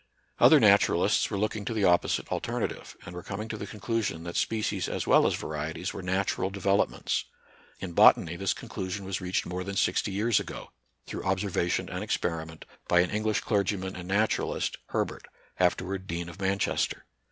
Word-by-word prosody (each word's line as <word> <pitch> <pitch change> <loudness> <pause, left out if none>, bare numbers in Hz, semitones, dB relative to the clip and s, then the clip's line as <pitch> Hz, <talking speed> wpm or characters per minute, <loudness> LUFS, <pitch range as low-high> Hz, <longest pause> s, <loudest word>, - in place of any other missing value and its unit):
Other - - +8
naturalists - - +4
were - - -2
looking 110 +1 -1
to 115 +1 -3
the 105 - 0
opposite 90 -2 +2
alternative, - - -3
and 85 - -8
were 90 - -6
coming 100 +5 -5
to 110 - -3
the 100 - -6
conclusion 105 -6 -2
that 85 0 -6
species 105 -4 0
as - - -2
well - - +5
as - - +1
varieties 80 +4 -4
were 100 - -6
natural 95 +1 0
developments. 100 0 0 0.5
In 90 -2 -6
botany, 85 0 +6
this 95 +2 -1
conclusion 95 +1 -5
was 95 0 -3
reached 90 0 -1
more 90 +1 -4
than 100 +1 -5
sixty 100 - +1
years 105 +3 +2
ago, - - -7 0.3
through - - -5
observation 95 -2 0
and - - -4
experiment, 80 -1 -3 0.2
by 90 - +5
an 90 - -1
English 110 0 0
clergyman 100 -3 -1
and 90 -1 -7
naturalist, 105 +3 0
Herbert, - - -3 0.3
afterward 95 +1 0
Dean 85 +1 -4
of 95 +3 -11
Manchester. 95 +1 0
95 Hz, 170 wpm, -28 LUFS, 90-100 Hz, 0.5 s, Other